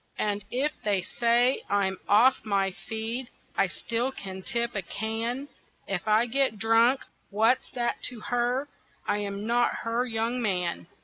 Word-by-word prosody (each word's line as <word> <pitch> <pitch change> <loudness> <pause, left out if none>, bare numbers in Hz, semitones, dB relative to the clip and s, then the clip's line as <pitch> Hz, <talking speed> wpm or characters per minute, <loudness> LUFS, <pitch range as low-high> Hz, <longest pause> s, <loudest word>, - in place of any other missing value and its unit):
And 205 -1 -1
if 275 +6 +1
they 200 -3 +1
say 240 +5 +2
I'm 195 -2 +1
off 235 +6 +5
my 195 -2 +1
feed 225 +5 -4 0.3
I - - +3
still 235 +3 -2
can 190 -6 -7
tip 235 +2 -1
a 195 - -1
can; 225 +8 -3 0.4
If 195 +1 -3
I 215 +2 +4
get 255 -2 +1
drunk 230 +4 +4 0.3
what's 225 +5 +2
that 240 -1 -1
to 245 -3 -3
her? 245 +4 0 0.4
I 205 - +1
am 200 0 -4
not 240 +1 +2
her 230 +2 0
young 230 +2 -1
man. 180 -6 -1
225 Hz, 150 wpm, -27 LUFS, 205-245 Hz, 0.4 s, off